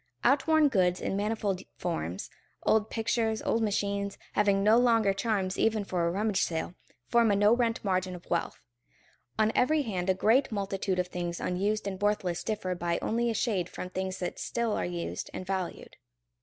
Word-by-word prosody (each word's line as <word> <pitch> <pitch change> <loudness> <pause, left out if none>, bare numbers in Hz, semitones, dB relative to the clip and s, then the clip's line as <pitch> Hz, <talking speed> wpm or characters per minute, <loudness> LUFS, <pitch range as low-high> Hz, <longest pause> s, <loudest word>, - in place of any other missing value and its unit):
Outworn 300 +3 +4
goods 180 -8 +2
in - - -2
manifold 205 -2 -1 0.2
forms, 95 - -3 0.3
old 220 0 +2
pictures, 225 -1 0
old 230 - +1
machines, 200 -1 -1 0.2
having 200 -1 +3
no 220 +3 +6
longer 225 -5 +4
charms 195 -2 -1
even 220 -2 +2
for 180 -3 -1
a - - +2
rummage 205 +3 0
sale, 165 +1 -2 0.3
form 235 -2 +4
a 200 - +3
no 205 +3 +5
rent 230 -3 0
margin 185 -1 0
of 175 - -12
wealth. - - -2 0.7
On 215 0 +3
every 300 +4 +3
hand 190 -6 -2
a 190 - +4
great 235 +8 +3
multitude 195 -2 -2
of 180 0 -1
things 175 -1 -4
unused 200 +4 -1
and 195 -1 -4
worthless 205 -4 0
differ 210 -4 -2
by 175 -1 -1
only 235 +1 0
a 225 - -1
shade 190 -8 0
from 180 - -7
things 190 0 -3
that 180 - -4
still 235 -2 -1
are - - -1
used 175 -1 -4
and 185 - -5
valued. 185 -2 -4
200 Hz, 180 wpm, -29 LUFS, 185-225 Hz, 0.7 s, no